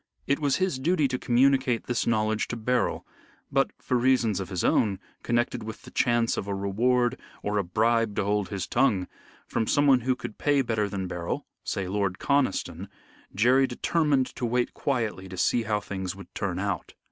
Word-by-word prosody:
It 140 Hz, +2 st, +1 dB
was 145 Hz, -3 st, +2 dB
his 185 Hz, -8 st, 0 dB
duty 155 Hz, +1 st, +2 dB
to 125 Hz, 0 st, -2 dB
communicate 130 Hz, -1 st, +2 dB
this 120 Hz, -, -1 dB
knowledge 110 Hz, -1 st, +1 dB
to -, -, -4 dB
Beryl, 125 Hz, +2 st, 0 dB, 0.5 s
but -, -, +2 dB
for -, -, -5 dB
reasons 120 Hz, -5 st, +2 dB
of 95 Hz, -, -5 dB
his 90 Hz, -4 st, -2 dB
own 100 Hz, -4 st, +2 dB, 0.2 s
connected 120 Hz, 0 st, 0 dB
with 110 Hz, 0 st, -8 dB
the -, -, -12 dB
chance 120 Hz, -2 st, +2 dB
of 100 Hz, -, -3 dB
a 100 Hz, -, -2 dB
reward 120 Hz, +5 st, +1 dB, 0.2 s
or 105 Hz, 0 st, 0 dB
a -, -, +1 dB
bribe 110 Hz, +3 st, +1 dB
to -, -, +1 dB
hold 100 Hz, -1 st, 0 dB
his 100 Hz, -2 st, -3 dB
tongue, 110 Hz, -8 st, +2 dB, 0.4 s
from 110 Hz, -, -1 dB
someone 145 Hz, -3 st, +4 dB
who 130 Hz, +1 st, 0 dB
could 120 Hz, -3 st, -8 dB
pay 145 Hz, -2 st, +3 dB
better 110 Hz, -4 st, 0 dB
than 95 Hz, -1 st, -3 dB
Beryl 85 Hz, -1 st, -4 dB, 0.2 s
say 95 Hz, -2 st, -2 dB
Lord 100 Hz, -1 st, -1 dB
Conniston 100 Hz, -, 0 dB, 0.5 s
Jerry 125 Hz, +6 st, +4 dB
determined 145 Hz, +1 st, +1 dB
to 130 Hz, -, -6 dB
wait 120 Hz, +1 st, 0 dB
quietly 115 Hz, -8 st, -2 dB
to 95 Hz, -, -8 dB
see 120 Hz, +6 st, +2 dB
how 105 Hz, -2 st, 0 dB
things 95 Hz, -2 st, -5 dB
would 100 Hz, -, -12 dB
turn 95 Hz, -3 st, -2 dB
out. 95 Hz, -4 st, -3 dB
115 Hz, 185 wpm, -27 LUFS, 100-130 Hz, 0.5 s, someone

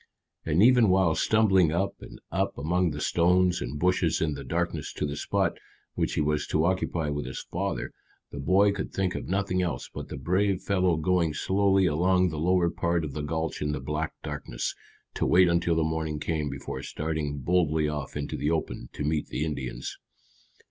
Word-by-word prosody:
And 80 Hz, +5 st, +4 dB
even 120 Hz, -3 st, +6 dB
while 95 Hz, -3 st, +4 dB
stumbling 95 Hz, -5 st, +3 dB
up 95 Hz, +4 st, -1 dB
and -, -, -11 dB
up -, -, -1 dB
among 90 Hz, +4 st, +1 dB
the 75 Hz, -1 st, -5 dB
stones 90 Hz, +3 st, +2 dB
and 60 Hz, +4 st, -4 dB
bushes 90 Hz, 0 st, +2 dB
in 80 Hz, -2 st, 0 dB
the 70 Hz, 0 st, -6 dB
darkness -, -, -2 dB
to -, -, -2 dB
the 70 Hz, -1 st, -3 dB
spot 75 Hz, -, -1 dB, 0.3 s
which -, -, -1 dB
he -, -, +1 dB
was 75 Hz, 0 st, 0 dB
to 80 Hz, +1 st, +1 dB
occupy 85 Hz, -3 st, 0 dB
with 75 Hz, -3 st, -3 dB
his 65 Hz, -, -6 dB
father, -, -, -2 dB, 0.4 s
the 70 Hz, -, -7 dB
boy 95 Hz, +8 st, +4 dB
could 100 Hz, -, -4 dB
think 95 Hz, -1 st, -1 dB
of -, -, -5 dB
nothing 95 Hz, -1 st, 0 dB
else 85 Hz, -3 st, -3 dB
but -, -, -6 dB
the -, -, -6 dB
brave 95 Hz, +7 st, +1 dB
fellow 90 Hz, -4 st, +2 dB
going 85 Hz, -1 st, +1 dB
slowly 95 Hz, +1 st, +2 dB
along 90 Hz, +3 st, +3 dB
the 80 Hz, -2 st, -5 dB
lower 85 Hz, +1 st, +2 dB
part 85 Hz, -1 st, 0 dB
of 70 Hz, -, -6 dB
the 75 Hz, -, -3 dB
gulch 80 Hz, +2 st, -3 dB
in 75 Hz, 0 st, 0 dB
the 75 Hz, -, -3 dB
black 75 Hz, +4 st, -3 dB
darkness, -, -, -4 dB, 0.4 s
to -, -, 0 dB
wait 90 Hz, +1 st, +6 dB
until 85 Hz, 0 st, +2 dB
the 80 Hz, -, +2 dB
morning 80 Hz, -1 st, -2 dB
came 75 Hz, -1 st, -1 dB
before 70 Hz, -1 st, -6 dB
starting 75 Hz, -2 st, -3 dB
boldly 80 Hz, 0 st, +1 dB
off 75 Hz, -1 st, -4 dB
into 70 Hz, -1 st, -3 dB
the 75 Hz, -, -1 dB
open 80 Hz, -6 st, -2 dB
to -, -, -4 dB
meet 75 Hz, 0 st, 0 dB
the 75 Hz, -, -2 dB
Indians. 65 Hz, -5 st, -5 dB
80 Hz, 195 wpm, -27 LUFS, 75-90 Hz, 0.4 s, even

